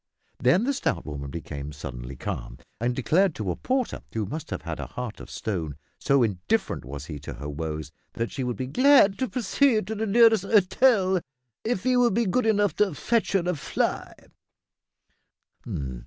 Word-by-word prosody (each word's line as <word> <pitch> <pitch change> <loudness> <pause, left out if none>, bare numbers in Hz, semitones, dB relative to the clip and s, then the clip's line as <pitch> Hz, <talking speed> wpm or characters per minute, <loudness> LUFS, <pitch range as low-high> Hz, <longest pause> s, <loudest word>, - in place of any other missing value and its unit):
Then 130 - +4
the 280 +3 +1
stout 85 - -1
woman 70 -2 -5
became 70 -2 -6
suddenly 60 -2 -7
calm, - - -5 0.2
and 120 +2 0
declared 165 +7 +2
to 100 -4 -2
a - - -3
porter 255 -1 -1
who 110 -2 -2
must 150 +10 -6
have - - -4
had - - -5
a - - -4
heart 125 -3 -6
of - - -10
stone, 85 -9 -3 0.2
so 140 -2 +3
indifferent 95 -6 -1
was 70 +3 -7
he 75 -3 -7
to 70 -2 -7
her 70 +4 -7
woes 75 0 -4 0.2
that 115 0 -3
she 135 - -3
would 125 -3 -2
be, 130 - -2
"glad 250 - +5
to 260 -2 0
proceed 245 -1 +2
to 220 - -4
the 220 +1 -2
nearest 225 -1 +5
'otel 195 -1 +3 0.4
if 220 -3 -1
'e 255 -1 +3
would 240 -5 +3
be 235 0 +2
good 225 +5 +1
enough 205 -2 +2
to 200 -6 +2
fetch 230 +4 0
her 195 - +4
a 180 - +1
fly." 145 - -2
155 Hz, 185 wpm, -26 LUFS, -, 0.4 s, glad